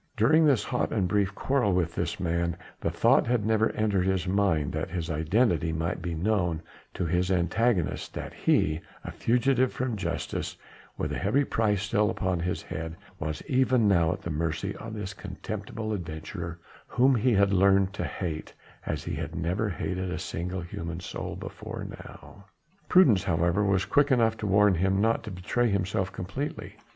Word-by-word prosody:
During 155 +9 +5
this 135 -6 +3
hot 125 - -1
and 100 -5 +1
brief 100 0 +1
quarrel 130 -8 +1
with 85 -2 +1
this - - -2
man, 85 -1 -1 0.2
the - - -1
thought - - +3
had 120 -3 +1
never 110 0 +3
entered 100 -4 +1
his 95 -1 0
mind 90 -6 +1
that - - -2
his 85 -2 -3
identity 85 +2 +2
might 80 +1 -2
be 85 -2 -3
known 85 -3 0 0.3
to 90 - -1
his 90 +2 +1
antagonist, 95 +1 +1
that - - -5
he 75 +1 +2 0.2
a - - -6
fugitive 125 +2 +2
from 125 -3 -2
justice 100 - -3
and - - -23
with - - -2
a - - -2
heavy 110 +10 +2
price 105 -6 +1
still 105 0 +2
upon 95 -2 -1
his 90 +2 -2
head 80 0 -5 0.2
was 75 0 -4
even 130 -3 +3
now 85 -5 +4
at - - -5
the 85 - -3
mercy 80 +5 -2
of 110 0 -7
this 105 -2 -5
contemptible 110 +3 -5
adventurer 85 -1 -5 0.3
whom 130 +2 +4
he 125 +1 +2
had 100 -1 +3
learnt 95 0 +4
to - - -3
hate 80 -4 -4 0.3
as - - -2
he - - -4
had - - -4
never 90 +6 -1
hated 95 -1 -3
a 90 - -3
single 90 +2 -4
human 85 0 -5
soul 90 - -5
before - - -7
now. 100 - -12 0.4
Prudence, 125 - +5
however, 85 +3 +2
was 95 -1 +2
quick 145 0 +3
enough 115 -4 +3
to 105 - -3
warn 100 0 +5
him 95 +3 +1
not 115 +2 +2
to 110 - -6
betray 105 +6 0
himself 95 -1 0
completely. 95 +12 -5
95 Hz, 180 wpm, -28 LUFS, 85-110 Hz, 0.4 s, During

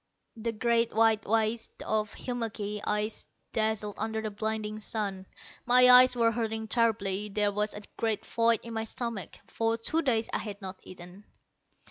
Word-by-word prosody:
The 230 0 -3
great 230 0 +1
white 220 -1 +3
waste 225 +1 -1
of 215 -1 -1
hummocky 215 -4 -4
ice 210 +1 -2 0.3
dazzled 215 -1 0
under 220 0 -2
the 215 -1 -4
blinding 215 0 -3
sun. 200 -3 -3 0.4
My 250 +1 +6
eyes 250 0 +8
were 230 -1 +3
hurting 220 -1 -3
terribly. 210 -3 0
There 205 0 +1
was 210 +1 -1
a 210 - -8
great 225 -2 -1
void 230 -1 +2
in 230 - -8
my 220 0 -2
stomach. 225 -5 -4
For 225 0 -1
two 315 +8 0
days 230 -7 +1
I - - 0
had 205 -2 -7
not 190 -1 -7
eaten. 180 +2 -13
220 Hz, 160 wpm, -29 LUFS, 210-230 Hz, 0.4 s, eyes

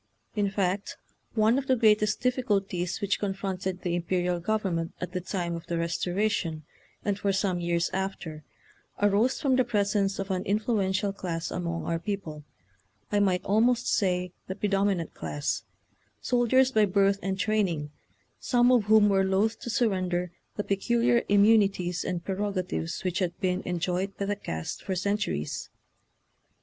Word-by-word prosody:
In 205 -2 +1
fact, 195 0 -1 0.4
one 220 +4 +4
of 270 - -6
the 260 - +4
greatest 215 -2 +3
diffi 250 0 +1
culties 195 -5 -1
which 200 -1 0
confronted 190 -2 -3
the 175 - -1
imperial 175 0 0
government 180 -4 -1
at 180 - -4
the 180 0 -3
time 175 -1 -3
of 170 - -8
the 170 - -2
Restora 175 +5 0
tion, 160 -5 -2 0.4
and 205 -1 0
for 200 -1 +1
some 190 -2 0
years 170 -1 0
after, 190 -5 -4 0.6
arose 205 +5 +3
from 270 -3 +2
the 255 - +4
presence 200 -3 +1
of 195 0 -3
an 185 -1 0
influential 200 -1 0
class 165 -4 -4
among 170 -1 -3
our 165 0 -1
people 165 -6 -5 0.3
— 95 -1 -40
I 205 - +3
might 190 -3 +1
almost 230 +5 +3
say 180 -3 +1 0.2
the 190 - -4
predominant 195 -4 0
class 145 0 -3 0.3
— - - -38 0.3
soldiers 255 +2 +3
by 215 -3 +4
birth 200 0 +2
and 190 0 -2
training, 185 -8 0 0.5
some 245 0 +3
of 240 -5 +4
whom 215 0 +6
were 195 -1 +3
loath 195 +4 +1
to - - -6
surrender 185 -6 0 0.2
the 205 - -2
peculiar 235 +4 +2
immunities 200 -4 +3
and 175 -2 -3
prerogatives 190 -4 -2
which 185 0 -1
had 175 -2 -2
been 185 -1 0
en 180 -1 -1
joyed 180 +3 -2
by 200 - -2
the 205 +1 -1
caste 80 - -5
for 190 - -3
centuries. 185 - -2
195 Hz, 160 wpm, -28 LUFS, 180-210 Hz, 0.6 s, whom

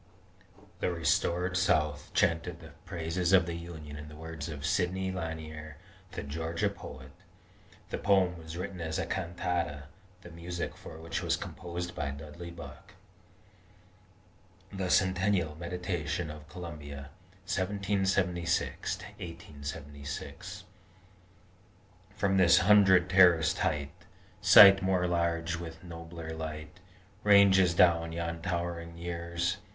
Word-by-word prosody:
"The - - 0
restored 85 +2 +1
South 75 -5 +1
chanted 85 +1 +1
the 80 -1 -12
praises 85 0 -1
of 95 -2 +6
the 85 - -4
Union 80 -3 -8
in 75 0 -8
the 75 - -11
words 80 -1 -7
of 75 -2 -6
Sidney 95 +4 0
Lanier, 80 -3 -6 0.4
the - - -4
Georgia 80 +3 -2
poet." 65 0 -10 0.8
The - - -2
poem 95 -3 +3
was 80 0 -9
written 90 0 -5
as 80 -1 -2
a - - -1
cantata, 85 -4 -2 0.4
the 90 - -11
music 85 +1 -5
for 80 - -11
which 80 +1 -4
was - - +1
composed 90 0 -6
by 70 - -3
Dudley 75 +5 -8
Buck. 85 0 -11 1.8
THE 95 -2 -2
CENTENNIAL 95 -3 +2
MEDITATION 85 -2 -3
OF 75 0 -11
COLUMBIA 75 -5 -8 0.3
1776 95 -3 0
1876 75 -6 -8 1.5
From 95 -1 +1
this 90 -2 +6
hundred 95 -2 +6
terraced 90 -4 +5
height, 75 0 -1 0.5
Sight 95 +1 +9
more 95 -1 +1
large 85 -1 0
with 80 -1 -8
nobler 85 -1 -8
light 80 +1 -6 0.4
Ranges 95 -4 +6
down 85 -2 +4
yon 85 0 -4
towering 85 -1 -3
years. 85 +1 -2
85 Hz, 115 wpm, -30 LUFS, 80-90 Hz, 1.8 s, Sight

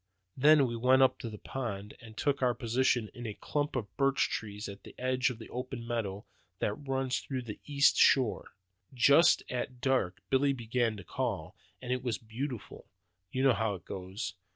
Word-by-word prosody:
Then 145 +1 +6
we 120 -2 -3
went 130 +3 +5
up 130 - +3
to 115 - -5
the 105 - -8
pond, 105 -5 -5
and 110 -2 -13
took 140 -2 0
our 125 -2 +2
position 120 -1 +1
in 120 -1 -7
a 105 - -5
clump 145 -1 -2
of 110 -6 -4
birch 135 -1 +2
trees 105 -1 -4
on 100 0 -8
the - - -12
edge 130 0 +1
of 125 - -6
the 110 - -11
open 125 -1 -5
meadow 105 -4 -3 0.3
that 105 - 0
runs 135 0 -2
round 130 -3 -3
the 105 - -7
east 140 -1 +4
shore. 125 -7 +3 0.4
Just 140 +7 +6
at 125 0 -4
dark 130 -9 +1
Billy 140 +1 +3
began 120 -2 -1
to 100 - -9
call, - - -3 0.3
and 125 0 -1
it 125 - -2
was 120 -3 -1
beautiful. 120 +2 -6 0.4
You 130 - -1
know 135 -2 +6
how 110 -2 0
it 90 - -12
goes. 95 +2 -5
125 Hz, 190 wpm, -31 LUFS, 110-130 Hz, 0.4 s, Then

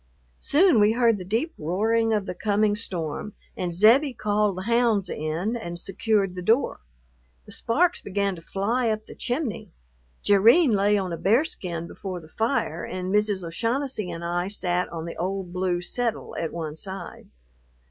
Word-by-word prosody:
Soon 320 - +4
we 210 +1 +5
heard 230 -3 +3
the - - -5
deep 230 - -1
roaring 220 +8 +1
of 210 -3 +1
the - - -4
coming 205 +2 +1
storm, 185 -1 -4 0.2
and 180 -1 -2
Zebbie 235 - +5
called 210 -2 +1
the 185 - -4
hounds 230 -4 +2
in 160 +9 -2
and 175 -7 -5
secured 200 -1 0
the 180 - -6
door. 225 +9 +2 0.7
The - - -13
sparks 345 +9 +1
began 200 -1 -1
to 165 - -11
fly 225 +8 0
up 215 0 -2
the - - -11
chimney. 245 -2 -3 0.5
Jerrine 230 - +6
lay 205 0 +3
on 185 -3 -2
a - - -3
bearskin 190 - 0
before 185 +1 -6
the 155 -2 -15
fire, 220 - -1
and 185 +1 -4
Mrs. 210 -2 +1
O'Shaughnessy 230 +4 -2
and 170 0 -5
I 175 +1 -1
sat 180 -3 0
on 165 -1 -6
the 170 - -7
old 185 0 -3
blue 180 -1 -1
"settle" 235 +4 -3
at 165 - -3
one 160 -3 -5
side. 190 +1 -8
200 Hz, 170 wpm, -25 LUFS, 180-230 Hz, 0.7 s, Jerrine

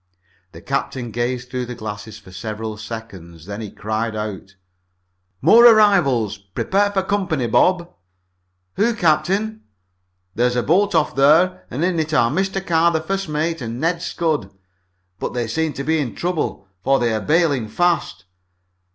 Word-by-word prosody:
The - - -12
captain 120 -3 -3
gazed 120 +2 -3
through 125 -1 -3
the 125 - -6
glasses 105 -1 -7
for 100 -3 -15
several 110 +3 -5
seconds. 100 -7 -9
Then 100 +3 -6
he 105 - -6
cried 110 +2 -3
out: 105 -2 -6 0.9
"More 235 +2 +7
arrivals! 175 - +4
Prepare 190 - 0
for 195 -2 0
company, 185 -9 -1
Bob!" 175 +9 +2 0.9
"Who, 230 +3 +2
captain?" 200 +5 +1 0.7
"There's 125 +2 +1
a 120 - +1
boat 195 +4 +2
off 160 -2 +1
there 155 +7 +3
and 150 +7 -1
in 180 -2 0
it 155 -1 -1
are 115 -6 +3
Mr. 190 +3 -1
Carr, 170 0 +3
the 160 - 0
first 195 +2 -3
mate, 155 +1 -1
and 115 0 -5
Ned 165 +2 0
Scudd! 155 - -1 0.7
But - - -4
they 120 -1 -1
seem 160 +7 -1
to 140 - -5
be 160 +2 +1
in 130 -6 -3
trouble, 170 - -3 0.2
for 135 0 +3
they 120 -3 0
are 110 - -1
bailing 150 - +1
fast. 165 - 0
140 Hz, 160 wpm, -20 LUFS, 110-175 Hz, 0.9 s, More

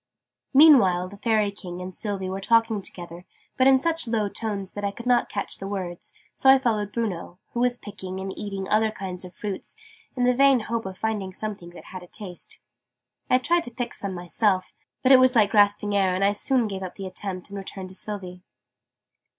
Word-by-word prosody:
Meanwhile 235 - +6
the 200 - -12
Fairy 215 -1 +1
King 180 -3 -8
and 180 0 -7
Sylvie 200 -4 -4
were 190 +1 -4
talking 225 0 +2
together, 175 -2 -7 0.3
but 260 - +4
in 265 -1 +6
such 330 -1 0
low 220 -3 0
tones 200 -3 -4
that 205 - -6
I 200 - +1
could 235 +4 -10
not 245 -1 +3
catch 200 - -2
the 195 - -5
words: 185 -3 -5 0.2
so 265 - +3
I 270 - +9
followed 215 -5 -1
Bruno, 195 -6 -3 0.2
who 240 - -2
was 245 0 +2
picking 190 -3 -7
and 190 0 -5
eating 195 -2 -5
other 220 +1 +3
kinds 190 -3 -6
of 180 - -12
fruit, 205 -3 -5 0.5
in 250 - 0
the 250 0 +4
vain 270 -1 +5
hope 225 -1 -3
of 190 -1 -8
finding 205 -4 -2
some 215 0 -3
that 175 -3 -13
had 185 - -7
a 180 - -13
taste. 180 -2 -9 0.7
I 255 - +5
tried 340 +7 +2
to 245 - -6
pick 240 0 -4
so 200 - -2
me 190 - -5
myself 185 +2 0 0.3
but 260 - +4
it 265 - +9
was 255 0 +5
like 210 -3 +4
grasping 205 0 +3
air, 190 -2 +2
and 190 - 0
I 200 - +4
soon 245 +4 +1
gave 195 -2 -5
up 185 -1 -6
the 195 - -7
attempt 185 0 -4
and 200 - -5
returned 190 -1 -7
to 185 - -9
Sylvie. 185 -3 -6
205 Hz, 215 wpm, -25 LUFS, 190-230 Hz, 0.7 s, I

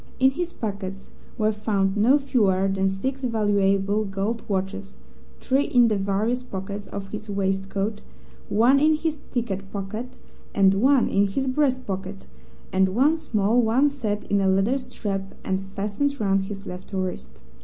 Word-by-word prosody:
In 265 +1 +5
his 345 +5 -3
pockets 195 - -6 0.3
were 215 -2 +2
found 205 -2 0
no 235 +7 +5
fewer 205 -9 +2
than 195 0 +1
six 260 +8 -3
valuable 205 -3 +2
gold 200 +3 -2
watches, 195 0 -3 0.4
three 270 +2 +1
in 240 -2 +4
the 215 - +1
various 205 +5 0
pockets 200 -3 -6
of 195 -1 -6
his 215 +1 -7
waist 195 -1 -1
coat, 205 +2 -2 0.5
one 240 +7 +4
in 310 +2 +4
his 310 -1 -2
ticket 195 -6 -3
pocket, 210 +4 -4 0.5
one 200 +7 +4
in 200 +1 +2
his 265 +8 -2
breast 260 -1 +1
pocket, 190 0 -5 0.5
and 190 0 +3
one 285 +6 +4
small 235 -7 +1
one 245 +6 +3
set 220 -7 -3
in 200 -1 +1
a 195 - +2
leather 195 +8 +2
strap 195 -6 -5
and 190 0 0
fastened 205 +9 -2
round 195 -2 +1
his 195 0 -7
left 180 +2 -8
wrist. 180 - -4
205 Hz, 155 wpm, -24 LUFS, 195-245 Hz, 0.5 s, In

